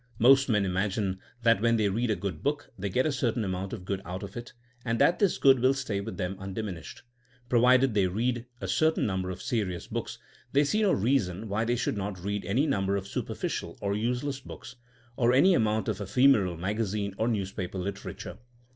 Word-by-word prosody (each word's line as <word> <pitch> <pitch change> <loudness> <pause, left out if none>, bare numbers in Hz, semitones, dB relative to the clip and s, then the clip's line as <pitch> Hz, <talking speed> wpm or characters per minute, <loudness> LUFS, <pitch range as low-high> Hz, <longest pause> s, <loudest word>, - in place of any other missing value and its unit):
Most 135 +3 +5
men 105 -3 +2
imagine 95 +1 -1 0.2
that 115 -3 +4
when 115 0 +3
they 105 -2 +2
read 115 +5 0
a 110 - +2
good 95 -7 -5
book 145 0 -2
they 100 0 -3
get 130 +7 +1
a 155 - +2
certain 120 -4 0
amount 95 0 -3
of 100 -6 -7
good 95 0 -2
out 90 +4 -6
of 100 -1 -8
it, 120 0 -7 0.3
and 115 -1 -1
that 175 +8 +3
this 200 -4 +2
good 135 -2 +5
will 130 +2 +3
stay 110 -8 -2
with - - -6
them 95 0 -2
undiminished. 95 -3 -6 0.5
Provided 125 +1 +4
they 100 -3 +3
read 120 +5 -1
a 95 - -4
certain 155 - +2
number 95 -2 -1
of 90 0 -6
serious 95 -7 -2
books, - - -5 0.4
they 140 +2 +5
see 210 +10 +1
no 205 -3 +3
reason 110 - 0
why 105 +3 -1
they 120 +1 +1
should 120 -3 -1
not 100 -1 -4
read 100 +1 -2
any 120 +10 +1
number 100 -9 0
of 100 -1 -3
superficial - - -4
or 100 0 -1
useless 125 +5 -1
books, 130 - -10 0.4
or 120 0 +3
any 165 +9 +6
amount 110 -7 +1
of 105 -2 -2
ephemeral 100 -5 +3
magazine 100 +2 -2
or 110 - +1
news 100 -5 -1
paper 95 0 -5
literature. 100 +2 -6
105 Hz, 205 wpm, -28 LUFS, 95-125 Hz, 0.5 s, any